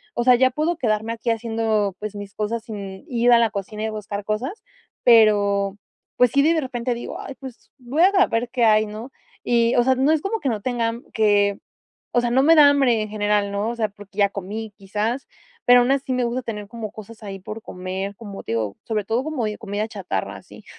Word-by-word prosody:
o 240 - 0
sea, 250 0 +6
ya 260 +1 +3
puedo 310 +5 -1
quedarme 220 -3 0
aquí 230 0 -2
haciendo, 225 -3 0
pues 215 0 -5
mis 205 -1 -8
cosas 220 +2 -2
sin 200 -4 -8
ir 240 0 +2
a 235 - +7
la 230 -1 +3
cocina, 210 +1 -5
y 220 - -1
buscar 205 -1 -5
cosas. 245 - -3 0.4
Pero, 205 -3 +4 0.4
pues 250 - +5
sí, 280 0 +3
de 325 +2 +4
de 320 - +1
repente 250 -2 -2
digo: 240 - -6
"Ay, 275 - -7
pues 260 -3 -11
voy 265 +7 +1
a 385 0 +5
ver 235 +1 -1
qué 245 -3 +2
hay", 215 0 +5
¿no? 215 +5 -8 0.3
Y, 235 -1 +3
o 240 - +4
sea, 260 0 +3
no 270 +4 +2
es 310 - +1
como 435 +3 -2
que - - -3
no 215 -3 -2
tenga 240 -1 -1
m 235 +1 -6
que 205 -2 +3 0.6
o 240 - +6
sea, 240 0 -1
no 260 +2 +4
me 325 +2 +7
da 290 -1 +9
hambre 260 -5 +3
en 215 - -4
general, 205 -1 0
¿no? 205 +3 -1
O 235 - -5
sea, 220 -2 0
porque 205 0 -15
ya 200 - +5
comí 205 +3 -6
quizás, 210 +6 -3 0.4
pero 245 0 +7
aún 245 +2 +2
así 275 -1 -1
me 250 -1 +1
gusta 245 +2 -2
tener 210 -3 -5
como 225 -3 -6
cosas 220 +1 -12
ahí, 195 -1 -6
por 215 +4 -7
comer. 190 +2 -5
Como 205 -3 -9
te - - -4
digo, 110 -3 -2
sobre 215 -2 -2
todo, 225 +5 0
como 310 -7 -2
de 210 - -4
comida 210 -1 -3
chatarra, 185 - -4
así. - - -14
225 Hz, 230 wpm, -22 LUFS, 205-245 Hz, 0.6 s, da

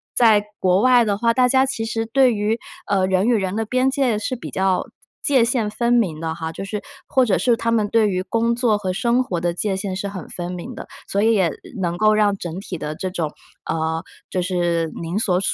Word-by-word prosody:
在 220 -4 +5 0.2
国 185 +1 +3
外 250 -2 +5
的 200 -1 0
话， 230 +1 +2
大 250 0 +4
家 265 +1 +4
其 225 -4 -3
实 225 0 -2
对 255 +1 +3
于， 215 +2 0 0.3
呃， 190 -2 +2
人 190 +2 +2
与 245 - +4
人 190 -1 -1
的 225 - 0
边 255 +4 +1
界 260 -6 +1
是 255 +4 -2
比 - - -8
较 190 -1 +1 0.4
界 260 -5 +4
限 230 -4 0
分 235 +3 0
明 185 -10 +1
的 160 -1 -3
哈， 160 -1 -4
就 195 - -6
是 205 +1 -4 0.3
或 260 - +3
者 215 - +2
是 240 -2 +3
他 230 0 -1
们 215 -2 +2
对 220 -1 +3
于 185 -1 -1
工 230 +3 0
作 235 -3 +2
和 190 -3 -2
生 235 +6 +1
活 180 -7 -3
的 175 0 -1
界 190 +2 -1
限 190 -1 -3
是 200 +1 -3
很 185 -5 -7
分 175 0 -5
明 180 +8 -7
的。 - - -8 0.2
所 200 - 0
以 225 0 +4
也 185 -5 +3 0.3
能 175 -1 -1
够 215 +1 +4
让 210 -1 +3
整 175 0 -5
体 190 -2 -6
的 150 0 -5
这 185 - -3
种， 165 -5 -3 0.4
呃， 160 0 -1 0.3
就 185 - -1
是 175 -3 0
您 170 +4 -3
所 185 -5 +2
205 Hz, 250 characters per minute, -21 LUFS, 180-230 Hz, 0.4 s, 在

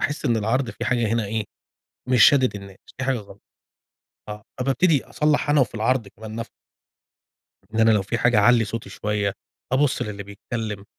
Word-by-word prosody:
باحس 145 - -2
إن 115 - +2
العرض 120 +4 0
في - - -6
حاجة 120 -2 +1
هنا 115 -1 0
إيه، 110 +1 -2 0.6
مش 125 -3 +5
شادد 130 -5 +4
الناس، 100 -1 -11 0.2
في 130 - -2
حاجة 135 0 +1
غلط، 105 -3 -11 0.9
آه، 105 0 -7 0.2
فبابتدي 140 +3 +2
أصلّح 150 -1 0
أنا 145 -1 +4
وفي 120 - 0
العرض 115 -1 0
كمان 110 0 -9
نفسه. 115 - -5 1.2
ده 110 0 +2
أنا 115 - +5
لو 105 -3 +3
في 105 +4 -3
حاجة 120 -3 +3
أعلي 120 +2 +5
صوتي 110 -2 -6
شويّة، 105 -1 -2 0.4
أبص 140 +1 +2
للي 100 -1 -5
بيتكلّم، 105 0 -6
115 Hz, 175 wpm, -23 LUFS, 105-130 Hz, 1.2 s, مش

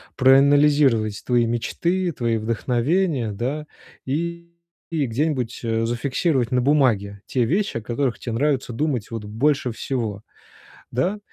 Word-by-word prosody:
проанализировать 135 -5 +4
твои 120 -2 +3
мечты, 170 +10 -1
твои 115 -6 -1
вдохновения, 120 - 0
да, 140 +9 -3 0.4
и 170 +4 -3 0.4
где-нибудь, 135 -4 -1
э, 115 0 0
зафиксировать 130 +1 0
на 125 - +2
бумаге 115 -8 +2
те 125 0 0
вещи, 190 - 0
о 115 - -4
которых 120 +2 -2
те 120 - -5
нравится 135 +1 0
думать, 125 -3 -2
вот, 115 -2 -5
больше 125 +4 0
всего. 115 -4 -3 0.7
Да? 180 - 0
130 Hz, 120 wpm, -22 LUFS, 115-150 Hz, 0.7 s, проанализировать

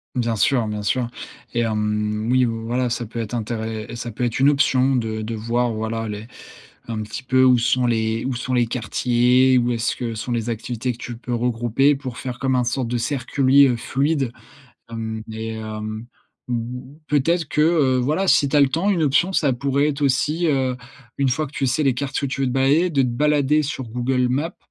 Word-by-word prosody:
Bien 120 -2 0
sûr, 120 +3 +2
bien 105 0 -3
sûr. 120 +4 0 0.5
Et 120 - 0
hem 105 0 -1
oui, 130 0 +4
heu, - - 0
voilà, 115 +2 -2
ça 120 0 -2
peut 115 +2 -7
être 115 +1 -4
intére 110 -1 -4
ça 120 0 -5
peut 115 - -4
être 120 0 -1
une 135 +2 +5
option 135 -2 +3
de 110 -3 -2
de 110 +1 -4
voir, 120 +2 0
voilà, 110 +1 -3
les 105 +1 -6 0.6
un 110 -2 -3
petit 110 +4 -6
peu 130 +1 +3
où 130 -1 +5
sont 125 +2 +2
les 110 -1 0
où 130 - -1
sont 125 +1 -4
les 120 -1 +3
quartiers, 125 +2 +2
où 120 -1 +2
est-ce 115 -1 0
que 115 -2 -4
sont 110 +3 -4
les 120 0 -1
activités 115 +2 -3
que 120 - -5
tu 120 -1 -7
peux 120 +1 -6
regrouper 120 +3 +2
pour 130 -4 -7
faire 125 -1 -6
comme 130 -1 +1
un 125 - +2
sorte 120 +1 -1
de 120 - -1
circuit, 135 +3 +3
heu, 125 - +1
fluide. 135 +1 -1 0.6
Hem 110 -1 -4
et 110 +1 -5
hem 110 0 -6 0.4
mmh, 125 +3 -4
peut-être 160 +3 +1
que, - - 0
heu, 150 -5 +3
voilà, 150 +10 0
si 145 -6 +4
tu 150 - +1
as - - +6
le 140 - +5
temps, 165 +9 0
une 170 -5 +2
option 150 +7 +2
ça 145 -7 +2
pourrait 140 +3 +1
être 145 0 -5
aussi, 150 +5 +1
heu, 130 -3 +1 0.4
une 140 -1 +2
fois 150 +5 0
que 140 - -14
tu 140 - -1
sais 140 +5 +1
les 135 -2 +3
quartiers 140 +2 -2
où - - -4
tu 140 +1 -4
veux 135 - +1
te - - -2
balader, 140 +7 +3
de 140 -4 +2
te - - +1
balader 150 +4 +2
sur 135 -2 -4
Google 125 +2 0
Maps 145 +7 -2
125 Hz, 220 wpm, -22 LUFS, 115-135 Hz, 0.6 s, as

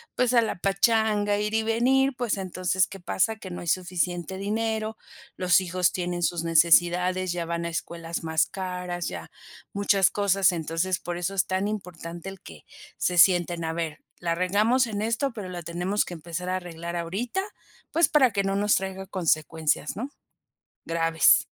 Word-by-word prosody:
pues 250 0 +2
a 235 - +6
la 225 - -1
pachanga 205 +1 +2
ir 210 +1 -2
y 225 - +2
venir, 260 +5 +2
pues 235 -5 -1
entonces, 185 0 0
¿qué 195 - -10
pasa?, 205 +5 0
que 190 - -9
no 175 - -5
hay 175 - -8
suficiente 180 +1 -1
dinero, 220 +2 -2 0.4
los 180 0 +4
hijos 180 -1 +1
tienen 175 -1 -3
sus 170 -1 0
necesidades, 175 +3 +4
ya 175 -1 -3
van 170 0 -3
a - - -2
escuelas 165 0 -5
más 160 -1 +2
caras, 180 -2 -4
ya 85 -2 -7 0.4
muchas 200 -2 +3
cosas. 195 -2 +3
Entonces, 165 +2 -1
por 175 0 -5
eso 180 +2 -2
es 190 - +1
tan 190 +2 0
importante 180 -4 -6
el 195 0 -10
que, 80 -3 -13 0.3
se 180 - 0
sienten 175 -1 +4
a 160 - -2
ver, 165 -2 -3 0.2
"la 170 -1 -1
regamos 210 +8 +2
en 205 -2 -3
esto, 230 +4 0
pero 200 -5 -6
la 175 -1 -6
tenemos 175 +5 -1
que - - -7
empezar 170 +2 -6
a 185 - 0
arreglar 170 -1 -6
ahorita, 195 - -2 0.5
pues, 335 +1 +4
para 275 -6 +4
que 200 -1 0
no 195 0 0
nos 205 +1 +3
traiga 190 0 -3
consecuencias, 160 -3 0
¿no?, 255 +6 -4 0.7
graves". 165 -1 +4
185 Hz, 175 wpm, -26 LUFS, 170-205 Hz, 0.7 s, a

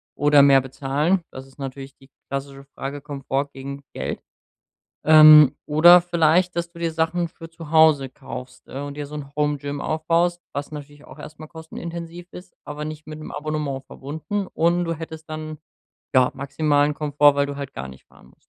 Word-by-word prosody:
oder 145 0 +5
mehr 135 -1 +6
bezahlen? 145 +7 -1
Das 130 0 -10
ist 135 - -22
natürlich 135 0 -8
die 135 - -21 0.2
klassische 140 0 -6
Frage: 140 +1 -6
Komfort 140 -1 -3
gegen 140 +1 -8
Geld. - - -5 0.8
Ähm, 155 -2 +9
oder 170 +4 +7
vielleicht, 175 +1 +2
dass 170 0 -3
du 170 - -13
dir 165 -1 -2
Sachen 165 +2 0
für 165 -1 -13
zu 165 -2 -11
Hause 155 -4 +5
kaufst, 130 -2 -10
ne, 140 +2 -6
und 140 0 -7
dir 145 0 -5
so 150 +1 -10
’n 145 -2 -7
Home-Gym 145 -1 -2
aufbaust, 170 +2 0
was 140 +1 -5
natürlich 145 -1 -10
auch - - -14
erst 155 - -11
mal 155 - -9
kostenintensiv 170 +2 -8
ist, 180 +1 -12
aber 150 +1 -6
nicht 155 0 -8
mit 155 0 -9
’nem 155 - -9
Abonnement 150 -3 -3
verbunden, 160 +8 -5
und 170 +2 +1
du 165 - -2
hättest 160 0 -9
dann, 155 0 -6 0.6
ja, 130 -1 +4
maximalen 145 +1 +1
Komfort, 145 -1 +3
weil 140 0 +2
du 140 0 -6
halt 140 -2 -7
gar 65 0 -7
nicht 65 0 -15
fahren - - -21
musst. - - -23
150 Hz, 185 wpm, -22 LUFS, 140-160 Hz, 0.8 s, Ähm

